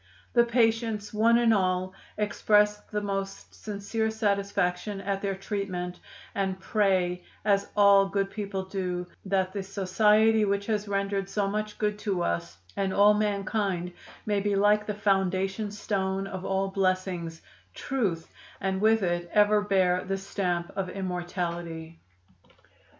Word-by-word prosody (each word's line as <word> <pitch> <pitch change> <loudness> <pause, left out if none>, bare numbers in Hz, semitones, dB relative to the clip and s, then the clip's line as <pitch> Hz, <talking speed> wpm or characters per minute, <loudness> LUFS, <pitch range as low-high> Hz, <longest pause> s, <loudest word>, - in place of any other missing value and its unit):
"The 235 -1 +5
patients, 225 -3 +1
one 230 +2 +4
and 235 -1 +4
all, 185 -2 0 0.2
express 210 0 +3
the 210 -1 -2
most 195 -1 -4
sincere 215 +2 -3
satisfaction 200 -2 -1
at 195 0 -2
their 195 -1 -1
treatment, 190 -3 -4 0.3
and 190 -1 -1
pray, 185 -3 +1 0.2
as 200 -1 +2
all 200 -1 +6
good 195 0 -1
people 200 -3 -4
do, 180 -2 -3 0.2
that 190 -1 0
the 200 - -2
society 210 +3 +3
which 200 0 0
has 210 -1 -1
rendered 195 -1 -1
so 200 0 0
much 210 +1 -3
good 210 -1 -1
to 195 -5 -1
us 85 0 -2 0.2
and 195 -1 0
all 205 +2 +6
mankind 200 -3 -1 0.3
may 205 -1 +1
be 205 0 0
like 210 +1 +3
the 210 - -2
foundation 195 0 0
stone 195 -2 -2
of 190 -1 -6
all 195 0 0
blessings 185 -3 -1 0.4
Truth 195 - -2 0.3
and 190 0 -1
with 220 0 +4
it 175 -1 -1
ever 210 0 +4
bear 185 -3 +2
the 195 0 -2
stamp 180 -3 -2
of 190 -2 -2
immortality." 175 -3 -4
195 Hz, 140 wpm, -27 LUFS, 185-210 Hz, 0.4 s, all